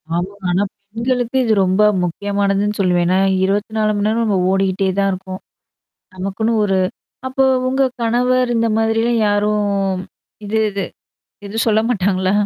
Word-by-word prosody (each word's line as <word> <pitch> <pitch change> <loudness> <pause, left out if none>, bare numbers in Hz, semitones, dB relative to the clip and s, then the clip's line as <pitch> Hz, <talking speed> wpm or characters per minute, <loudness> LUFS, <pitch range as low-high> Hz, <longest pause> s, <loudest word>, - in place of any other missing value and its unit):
ஆமா. 180 +3 -2 0.2
ஆனா, 185 +3 +2 0.3
பெண்களுக்கு 245 +2 -1
இது 225 -3 +2
ரொம்ப 190 +3 +2 0.2
முக்கியமானதுன்னு 200 +3 -1
சொல்லுவேன். 180 -2 +2
ஏன்னா, 185 +1 +2 0.3
24 215 +2 0
மணி 205 - 0
நேரம் 225 +2 +1
நம்ம 205 -3 +1
ஓடிக்கிட்டே 195 0 +1
தான் 195 0 +2
இருக்கோம். 185 0 -7 0.7
நமக்குன்னு 195 +5 -2
ஒரு 195 -2 +1 0.5
அப்போ 265 +1 +1 0.2
உங்க 265 +1 +1 0.2
கணவர் 250 +2 +1
இந்தமாதிரிலாம் 225 +1 +1
யாரும் 210 +1 +1 0.8
இது, 215 +2 -1
இது. 200 -1 -3 0.6
இது 200 +2 -7
சொல்ல 220 -1 +3
மாட்டாங்களா? 190 -4 +1
205 Hz, 130 wpm, -18 LUFS, 195-225 Hz, 0.8 s, சொல்ல